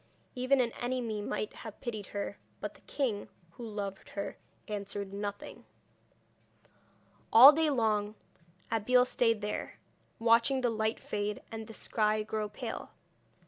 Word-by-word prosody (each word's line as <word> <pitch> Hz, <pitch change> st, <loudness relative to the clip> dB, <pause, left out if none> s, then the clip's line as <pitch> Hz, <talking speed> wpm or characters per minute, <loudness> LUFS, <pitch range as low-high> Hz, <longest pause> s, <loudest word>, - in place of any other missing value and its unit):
Even 255 Hz, +2 st, +2 dB
an 235 Hz, -2 st, 0 dB
enemy 240 Hz, -4 st, -2 dB
might 210 Hz, +1 st, -3 dB
have 220 Hz, -2 st, -9 dB
pitied 215 Hz, -5 st, -5 dB
her; 205 Hz, 0 st, -4 dB, 0.2 s
but -, -, -4 dB
the -, -, -20 dB
king, 235 Hz, -8 st, -2 dB, 0.2 s
who 240 Hz, -, -10 dB
loved 200 Hz, -2 st, -5 dB
her, 200 Hz, -, -4 dB, 0.3 s
answered 200 Hz, -1 st, -4 dB
nothing. 205 Hz, 0 st, -5 dB, 1.7 s
All 255 Hz, +6 st, +12 dB
day 315 Hz, +1 st, +2 dB
long 215 Hz, -5 st, +1 dB, 0.6 s
Abeille 250 Hz, +3 st, +4 dB
stayed 230 Hz, -3 st, +2 dB
there, 210 Hz, +1 st, -4 dB, 0.4 s
watching 235 Hz, +4 st, +4 dB
the 245 Hz, -2 st, +2 dB
light 220 Hz, 0 st, 0 dB
fade, 205 Hz, 0 st, -3 dB
and 220 Hz, -1 st, -6 dB
the 225 Hz, -, -10 dB
sky 215 Hz, -1 st, +1 dB
grow 215 Hz, 0 st, -2 dB
pale. 205 Hz, -, -6 dB
220 Hz, 135 wpm, -31 LUFS, 205-240 Hz, 1.7 s, All